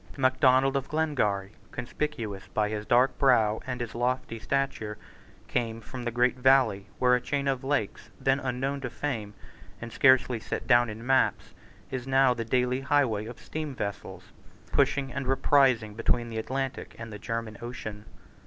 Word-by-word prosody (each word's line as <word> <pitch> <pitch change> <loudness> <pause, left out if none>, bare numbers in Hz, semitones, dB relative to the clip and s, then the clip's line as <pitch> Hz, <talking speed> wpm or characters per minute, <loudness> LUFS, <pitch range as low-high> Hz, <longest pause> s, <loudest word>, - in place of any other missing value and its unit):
Macdonald 130 +1 +3
of 135 -1 -2
Glengarry, 110 -11 0 0.2
conspicuous 120 -5 -4
by 105 -1 0
his 105 0 -4
dark 125 +1 +4
brow 110 -6 +4
and 125 -1 -3
his 120 -2 -4
lofty 120 -1 -1
stature, 110 -5 -2 0.5
came 115 -1 -2
from 125 +3 -8
that 120 - -2
great 125 +1 +2
valley 130 -7 +4
where 125 -1 +4
a 125 - +3
chain 140 +2 -2
of 135 -2 0
lakes, 135 -7 -2
then 135 +1 +2
unknown 135 +1 -2
to 130 - -3
fame, 110 -8 -4 0.4
and 115 +1 -8
scarcely 130 -3 +4
set 110 - -5
down 120 -1 +4
in 110 +2 -8
maps, 135 0 +1 0.4
is 130 -1 -4
now 135 -1 +4
the 115 -1 -3
daily 125 +2 +1
highway 130 -7 +1
of 120 - -9
steam 155 -3 -5
vessels 100 -4 -6 0.4
passing 135 -3 +1
and 135 0 -3
reprising 130 -5 +3
between 120 +1 0
the 110 -1 -3
Atlantic 135 +3 -4
and 115 -1 -8
the 105 - -7
German 115 -1 -4
Ocean. 110 -3 -7
125 Hz, 160 wpm, -28 LUFS, 110-135 Hz, 0.5 s, dark